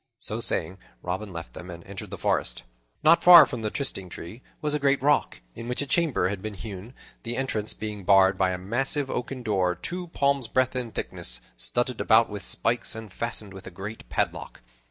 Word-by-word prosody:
So - - -3
saying, 95 +1 -1 0.2
Robin 95 +3 -3
left 85 -1 -7
them 90 - -9
and 85 -1 -9
entered 95 +1 -8
the - - -6
forest. - - 0 0.4
Not 165 +2 +6
far 175 -1 +10
from 120 - -6
the 110 - -1
trysting 105 -9 -2
tree 95 +9 -9 0.2
was 150 -1 -1
a 150 - +1
great 140 -1 +3
rock 145 +1 +2
in 115 - -8
which 125 - -3
a 145 - -1
chamber 155 - +1
had 100 -1 -4
been 110 0 -5
hewn, 105 +4 -8 0.3
the 120 -1 -4
entrance 110 -6 -2
being 105 -2 -6
barred 95 0 +5
by 95 0 +2
a 90 - -2
massive 130 +8 -1
oaken 125 +1 -4
door 95 -5 +1
two 180 - -5
palms' 140 -6 +1
breadth 130 +2 +1
in 125 -3 -3
thickness, - - -2 0.2
studded 120 - 0
about 110 0 +4
with 100 -2 -6
spikes, 120 +5 -1
and 110 -4 -9
fastened 110 -4 -2
with 95 -1 -10
a - - -5
great 95 +5 -8
padlock. - - -2
110 Hz, 200 wpm, -26 LUFS, 95-130 Hz, 0.4 s, far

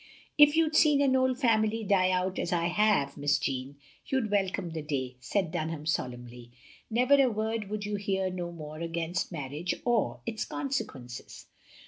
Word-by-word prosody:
" - - -28
If 295 0 +8
you'd 320 -1 +2
seen 300 -3 +5
an 270 -2 +3
old 260 -1 +2
family 225 -3 +2
die 190 -2 +3
out 185 0 0
as 175 - -2
I 170 -1 +1
have. 180 -7 +2
Miss 145 0 +2
Jeanne, 135 0 -3 0.3
you 265 - +1
'd 220 -5 -3
welcome 190 -4 0
the 160 -1 -4
day," 130 -4 -3
said 170 +7 -1
Dun 160 0 -2
ham, 155 -2 -6
solemnly. 125 -4 -4 0.2
" - - -23
Never 255 +5 +4
a 260 - +4
word 220 -1 -2
wotild 210 -1 -3
you 210 0 -2
hear 190 -2 -1
no 175 -1 -4
more 155 -2 -8
against 170 +2 -2
marriage 150 +2 -3
or 240 -3 +1
its 225 -2 -3
consequences. 200 - -5
185 Hz, 185 wpm, -29 LUFS, 155-225 Hz, 0.3 s, If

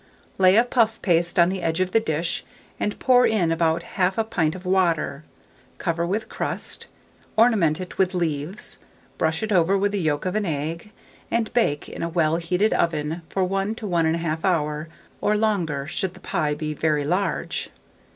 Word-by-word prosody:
Lay 185 +1 +6
a 230 - +7
puff 230 -2 +1
paste 175 -2 +2
on 170 0 +6
the 190 0 -3
edge 165 0 -1
of 185 0 0
the 225 - +4
dish, 165 -5 -2 0.4
and 210 - -1
pour 250 -1 +5
in 185 -7 +1
about 165 0 +1
1/2 195 +4 -1
pint 160 -2 +1
of 185 0 -10
water; 170 -6 +1 0.5
cover 170 0 -1
with 210 +5 -2
crust, - - -4 0.5
ornament 210 -9 +4
it 185 -1 -8
with 185 -1 +2
leaves, 165 +2 -2 0.4
brush 160 +4 0
it 220 - -2
over 185 +1 +4
with 200 +1 +1
the 205 -2 -1
yolk 150 -1 0
of 185 - -1
an 215 - 0
egg, 165 +6 -3 0.4
and 230 -1 -1
bake 185 -12 +1
in - - -7
a 170 - -1
well 165 -1 +2
heated 180 +5 +1
oven 160 0 0
for 190 - 0
1 195 +3 -1
to 225 - -7
1 170 -4 +2
1/2 165 -1 -2
hour, 155 -4 0 0.3
or 210 0 +2
longer, 175 -10 0
should 180 +4 -3
the - - -13
pie 150 -4 -1
be 155 0 -3
very 150 -1 0
large. 180 +6 -1
175 Hz, 180 wpm, -24 LUFS, 160-200 Hz, 0.5 s, a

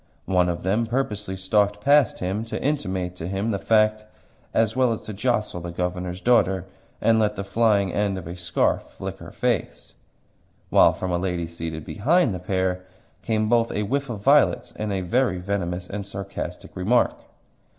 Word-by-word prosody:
One 90 -1 +2
of 85 - -3
them 105 +5 +1
purposely 105 -6 -2
stalked 100 +2 +1
past 140 +1 +4
him 95 +4 -2
to 115 - -4
intimate 95 -11 -2
to 85 - -5
him 100 +4 -1
the 100 - -1
fact, 110 0 +3 0.5
as 110 0 +1
well 130 -2 +3
as 115 - -2
to 110 - -7
jostle 105 -4 -1
the 85 - -5
Governor's 90 +1 -3
daughter, 95 -6 +3 0.3
and 115 -1 +3
let 105 -1 +1
the 100 - -4
flying 100 -2 +2
end 100 -2 0
of 90 - -7
a 85 +2 -6
scarf 85 -2 +1
flick - - -7
her - - -9
face; - - -2 0.8
while - - +6
from 95 - -4
a 85 - +1
lady 90 -2 -1
seated 80 -2 -6
behind 135 - +2
the 90 - -4
pair 90 0 -1 0.4
came 110 -1 0
both 115 0 +2
a 105 - -1
whiff 140 +5 -1
of 110 -4 -5
violets - - +4
and 105 -1 -4
a 95 -1 -1
very 115 +2 +1
venomous 90 -1 -3
and 100 0 -5
sarcastic 100 0 -6
remark. 110 +7 +2
100 Hz, 180 wpm, -24 LUFS, 90-110 Hz, 0.8 s, while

